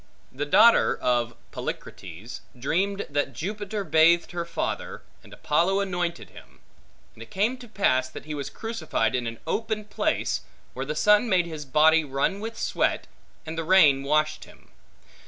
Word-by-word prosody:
The 145 Hz, +3 st, -4 dB
daughter 230 Hz, +10 st, +5 dB
of 120 Hz, -1 st, 0 dB, 0.2 s
Polycrates, 95 Hz, +7 st, -7 dB, 0.2 s
dreamed 195 Hz, +10 st, -1 dB
that 145 Hz, 0 st, -2 dB
Jupiter 205 Hz, +3 st, -4 dB
bathed 165 Hz, +1 st, +4 dB
her 170 Hz, -1 st, -3 dB
father, 170 Hz, -, -4 dB, 0.2 s
and -, -, -17 dB
Apollo 175 Hz, +6 st, +1 dB
anointed 175 Hz, -3 st, -3 dB
him; -, -, -16 dB, 0.5 s
and -, -, -16 dB
it 115 Hz, -, -10 dB
came 210 Hz, +6 st, 0 dB
to 245 Hz, -, -11 dB
pass, 130 Hz, -, +1 dB
that -, -, -10 dB
he 155 Hz, -, -5 dB
was 140 Hz, -2 st, -4 dB
crucified 225 Hz, -, -2 dB
in 125 Hz, -2 st, -1 dB
an 115 Hz, 0 st, -5 dB
open 220 Hz, -1 st, -2 dB
place, 210 Hz, -, -1 dB, 0.3 s
where 135 Hz, +1 st, -5 dB
the 150 Hz, -, -3 dB
sun 210 Hz, +7 st, +4 dB
made 180 Hz, -3 st, +3 dB
his 155 Hz, -3 st, -7 dB
body 155 Hz, +4 st, +4 dB
run 140 Hz, +7 st, -1 dB
with 225 Hz, +2 st, -6 dB
sweat, -, -, 0 dB, 0.4 s
and 160 Hz, +1 st, -5 dB
the -, -, -2 dB
rain 155 Hz, -6 st, +5 dB
washed 155 Hz, +2 st, 0 dB
it. -, -, -16 dB
160 Hz, 160 wpm, -25 LUFS, 140-200 Hz, 0.5 s, daughter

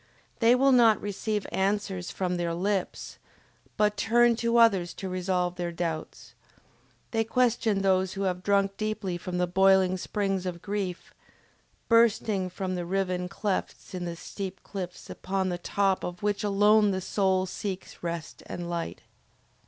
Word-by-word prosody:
They 235 Hz, +1 st, +5 dB
will 270 Hz, +2 st, +4 dB
not 230 Hz, -5 st, +6 dB
receive 205 Hz, +1 st, -3 dB
answers 195 Hz, -2 st, -1 dB
from 180 Hz, -1 st, -2 dB
their 170 Hz, -1 st, -1 dB
lips, 195 Hz, +1 st, -2 dB, 0.6 s
but 210 Hz, -1 st, +2 dB
turn 235 Hz, +2 st, +4 dB
to 235 Hz, 0 st, +1 dB
others 195 Hz, -7 st, +4 dB
to 190 Hz, -, -5 dB
resolve 180 Hz, -1 st, -1 dB
their 175 Hz, -1 st, -2 dB
doubts; 165 Hz, -2 st, -5 dB, 0.8 s
they 225 Hz, -1 st, +1 dB
question 225 Hz, -4 st, +1 dB
those 190 Hz, -1 st, +2 dB
who 195 Hz, -, -3 dB
have 180 Hz, -1 st, -1 dB
drunk 195 Hz, 0 st, +1 dB
deeply 215 Hz, -4 st, -2 dB
from 180 Hz, +1 st, -4 dB
the 180 Hz, -, +2 dB
boiling 190 Hz, 0 st, +4 dB
springs 195 Hz, -1 st, -2 dB
of 175 Hz, -1 st, -4 dB
grief, 200 Hz, -3 st, -4 dB, 0.7 s
bursting 220 Hz, -4 st, +3 dB
from 185 Hz, +1 st, -4 dB
the 180 Hz, -1 st, -2 dB
riven 180 Hz, -1 st, -1 dB
clefts 200 Hz, +1 st, -3 dB
in 180 Hz, -1 st, -4 dB
the 170 Hz, -1 st, -4 dB
steep 190 Hz, +1 st, -7 dB
cliffs 180 Hz, -3 st, -7 dB
upon 190 Hz, 0 st, -2 dB
the 175 Hz, -1 st, -3 dB
top 195 Hz, +1 st, 0 dB
of 180 Hz, +3 st, -6 dB
which 205 Hz, 0 st, 0 dB
alone 210 Hz, +1 st, +4 dB
the 190 Hz, -1 st, 0 dB
soul 190 Hz, 0 st, +1 dB
seeks 190 Hz, 0 st, -6 dB
rest 170 Hz, -2 st, -5 dB
and 175 Hz, -1 st, -5 dB
light. 170 Hz, -1 st, -4 dB
190 Hz, 150 wpm, -28 LUFS, 180-210 Hz, 0.8 s, not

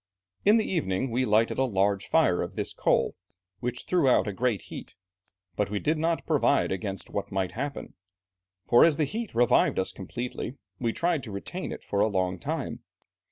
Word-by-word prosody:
In 210 Hz, +3 st, +7 dB
the 220 Hz, -, +1 dB
evening 130 Hz, -, -1 dB
we 125 Hz, +3 st, +1 dB
lighted 110 Hz, +2 st, +2 dB
a -, -, +4 dB
large 100 Hz, -4 st, +1 dB
fire -, -, +3 dB
of -, -, -5 dB
this -, -, -3 dB
coal, -, -, +2 dB, 0.5 s
which 125 Hz, +1 st, -3 dB
threw 175 Hz, -6 st, +2 dB
out 125 Hz, -, +3 dB
a 105 Hz, -, -2 dB
great 115 Hz, 0 st, 0 dB
heat, -, -, -9 dB, 0.6 s
but 105 Hz, -, 0 dB
we 105 Hz, -, -2 dB
did 155 Hz, +9 st, 0 dB
not 165 Hz, +1 st, 0 dB
provide -, -, +2 dB
against 95 Hz, -1 st, -4 dB
what 100 Hz, -, -3 dB
might 95 Hz, -1 st, -1 dB
happen, 140 Hz, +4 st, -5 dB, 0.7 s
for 120 Hz, -, +6 dB
as 160 Hz, -3 st, +4 dB
the 155 Hz, -, +2 dB
heat 220 Hz, -, -5 dB
revived 120 Hz, 0 st, +4 dB
us 95 Hz, -, 0 dB
completely, 120 Hz, +6 st, -5 dB, 0.2 s
we 115 Hz, -2 st, 0 dB
tried 170 Hz, +3 st, 0 dB
to 110 Hz, -, -8 dB
retain 175 Hz, -, -5 dB
it -, -, -7 dB
for 100 Hz, -, -2 dB
a 105 Hz, -, +4 dB
long 95 Hz, -3 st, -1 dB
time. -, -, -3 dB
120 Hz, 190 wpm, -27 LUFS, 100-145 Hz, 0.7 s, In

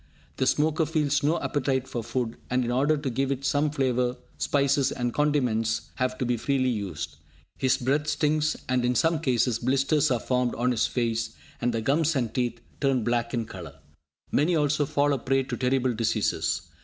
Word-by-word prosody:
The -, -, +1 dB
smoker 155 Hz, +1 st, +2 dB
feels 150 Hz, -3 st, +1 dB
no 155 Hz, +4 st, +1 dB
appetite 130 Hz, -2 st, -1 dB
for 120 Hz, -, -4 dB
food, 120 Hz, -1 st, -3 dB
and 125 Hz, 0 st, +1 dB
in 120 Hz, -, -1 dB
order 140 Hz, +5 st, +2 dB
to 145 Hz, -2 st, -3 dB
give 135 Hz, +3 st, 0 dB
it 135 Hz, 0 st, -3 dB
some 145 Hz, +2 st, +2 dB
flavour, 125 Hz, -3 st, 0 dB, 0.2 s
spices 140 Hz, -1 st, +2 dB
and 120 Hz, -2 st, -2 dB
condiments 125 Hz, -7 st, 0 dB
have 130 Hz, 0 st, -1 dB
to 130 Hz, -, -1 dB
be 120 Hz, 0 st, 0 dB
freely 130 Hz, +2 st, +1 dB
used. 90 Hz, -10 st, -4 dB, 0.4 s
His 130 Hz, -1 st, +3 dB
breath 140 Hz, +4 st, 0 dB
stinks, 155 Hz, +1 st, +1 dB
and, 125 Hz, 0 st, +1 dB
in 125 Hz, 0 st, +1 dB
some 165 Hz, +2 st, +2 dB
cases, 125 Hz, -5 st, +1 dB
blisters 135 Hz, +4 st, +2 dB
are 125 Hz, -2 st, +1 dB
formed 125 Hz, 0 st, 0 dB
on 125 Hz, +2 st, +1 dB
his 115 Hz, -, +1 dB
face, 115 Hz, -2 st, -1 dB, 0.3 s
and 120 Hz, 0 st, +1 dB
the 115 Hz, -1 st, -2 dB
gums 150 Hz, +6 st, +2 dB
and 120 Hz, -4 st, -1 dB
teeth 120 Hz, -2 st, -1 dB, 0.2 s
turn 135 Hz, -4 st, +1 dB
black 120 Hz, 0 st, 0 dB
in 115 Hz, -2 st, -1 dB
colour. 85 Hz, -9 st, -9 dB, 0.6 s
Many 165 Hz, +4 st, +2 dB
also 150 Hz, -1 st, +1 dB
fall 145 Hz, +1 st, +2 dB
a 135 Hz, -, -1 dB
prey 135 Hz, +2 st, +1 dB
to 130 Hz, -2 st, -4 dB
terrible 125 Hz, 0 st, +1 dB
diseases. 115 Hz, -1 st, 0 dB
130 Hz, 190 wpm, -26 LUFS, 120-145 Hz, 0.6 s, His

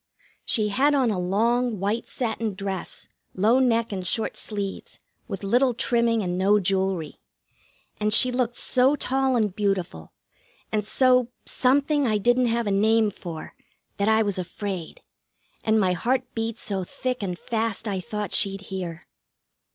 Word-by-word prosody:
She 215 Hz, -3 st, +1 dB
had 280 Hz, +8 st, +3 dB
on 255 Hz, -5 st, +2 dB
a 190 Hz, -, -1 dB
long, 225 Hz, +5 st, +1 dB
white 205 Hz, +4 st, -1 dB
satin 225 Hz, -4 st, -2 dB
dress, 195 Hz, -2 st, -5 dB, 0.3 s
low 220 Hz, +7 st, +4 dB
neck 230 Hz, -3 st, +2 dB
and 185 Hz, -2 st, -3 dB
short 220 Hz, +4 st, -1 dB
sleeves, 200 Hz, -2 st, -3 dB, 0.3 s
with 195 Hz, -3 st, -6 dB
little 245 Hz, +5 st, +2 dB
trimming 235 Hz, -2 st, +2 dB
and 180 Hz, 0 st, -2 dB
no 205 Hz, +2 st, +4 dB
jewelry. 190 Hz, -4 st, -1 dB, 0.8 s
And 210 Hz, 0 st, +1 dB
she 250 Hz, +4 st, +5 dB
looked 245 Hz, -1 st, -1 dB
so 260 Hz, +3 st, +3 dB
tall 265 Hz, -1 st, +1 dB
and 210 Hz, -5 st, 0 dB
beautiful, 190 Hz, -, -2 dB, 0.6 s
and 215 Hz, -1 st, 0 dB
so 250 Hz, +2 st, +3 dB, 0.2 s
something 280 Hz, +2 st, +2 dB
I 215 Hz, -2 st, +2 dB
didn't 245 Hz, +4 st, +3 dB
have 235 Hz, 0 st, 0 dB
a 205 Hz, -, 0 dB
name 215 Hz, +2 st, +3 dB
for, 165 Hz, -4 st, -8 dB, 0.4 s
that 200 Hz, +2 st, +1 dB
I 220 Hz, 0 st, +4 dB
was 200 Hz, -3 st, -1 dB
afraid, 185 Hz, -1 st, -5 dB, 0.6 s
and 220 Hz, 0 st, +3 dB
my 185 Hz, -3 st, +2 dB
heart 255 Hz, +8 st, 0 dB
beat 225 Hz, 0 st, -3 dB
so 195 Hz, -2 st, -3 dB
thick 255 Hz, +7 st, -4 dB
and 180 Hz, -3 st, -3 dB
fast 225 Hz, +1 st, -2 dB
I 195 Hz, -2 st, -1 dB
thought 210 Hz, +1 st, -5 dB
she'd 195 Hz, 0 st, 0 dB
hear. 175 Hz, -3 st, -5 dB
215 Hz, 155 wpm, -25 LUFS, 195-240 Hz, 0.8 s, she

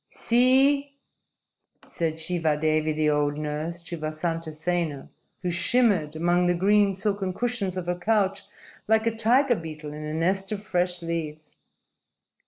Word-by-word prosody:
_ -, -, -56 dB
"See!" 270 Hz, +4 st, +3 dB, 0.9 s
said 165 Hz, -2 st, -2 dB
Shivadevi, 155 Hz, -2 st, 0 dB
the 155 Hz, 0 st, +1 dB
old 145 Hz, 0 st, 0 dB
nurse, 155 Hz, +3 st, -4 dB
to 170 Hz, 0 st, -7 dB
Vasantasena, 155 Hz, 0 st, -3 dB, 0.3 s
who 180 Hz, -, -1 dB
shimmered 175 Hz, -4 st, +2 dB
among 175 Hz, +2 st, +2 dB
the 175 Hz, -, +2 dB
green, 200 Hz, +2 st, +3 dB
silken 195 Hz, -1 st, -1 dB
cushions 225 Hz, -6 st, -2 dB
of 180 Hz, -, -3 dB
her 175 Hz, -, 0 dB
couch 195 Hz, 0 st, 0 dB, 0.4 s
like 220 Hz, +1 st, +3 dB
a 230 Hz, -1 st, 0 dB
tiger 245 Hz, +4 st, +3 dB
beetle 155 Hz, -4 st, -7 dB
in 150 Hz, 0 st, -7 dB
a 155 Hz, +1 st, -4 dB
nest 190 Hz, +4 st, 0 dB
of 205 Hz, -1 st, -4 dB
fresh 180 Hz, -2 st, -1 dB
leaves. 155 Hz, -2 st, -5 dB
175 Hz, 140 wpm, -25 LUFS, 155-205 Hz, 0.9 s, See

